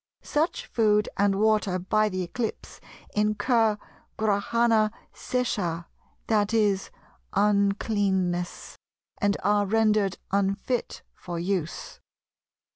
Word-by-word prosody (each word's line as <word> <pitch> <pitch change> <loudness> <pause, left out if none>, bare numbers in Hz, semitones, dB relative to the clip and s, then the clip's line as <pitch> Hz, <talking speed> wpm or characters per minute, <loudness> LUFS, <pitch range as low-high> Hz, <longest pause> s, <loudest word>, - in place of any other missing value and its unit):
Such 335 +11 -1
food 210 - +2
and 200 0 +2
water, 210 -3 +2
by 215 +4 +1
the 185 -2 -2
eclipse, 220 +6 -5 0.3
incur 215 +1 +2 0.4
Grahana 220 +1 +2 0.2
seshah, 190 -10 -2 0.4
that 215 0 +1
is, 205 -3 +2 0.4
uncleanness, 200 -3 0 0.4
and 205 0 +1
are 205 +1 +2
rendered 215 -2 +2 0.2
unfit 200 +5 -1
for 175 -1 -7
use. 175 -2 -3
205 Hz, 90 wpm, -26 LUFS, 195-220 Hz, 0.4 s, food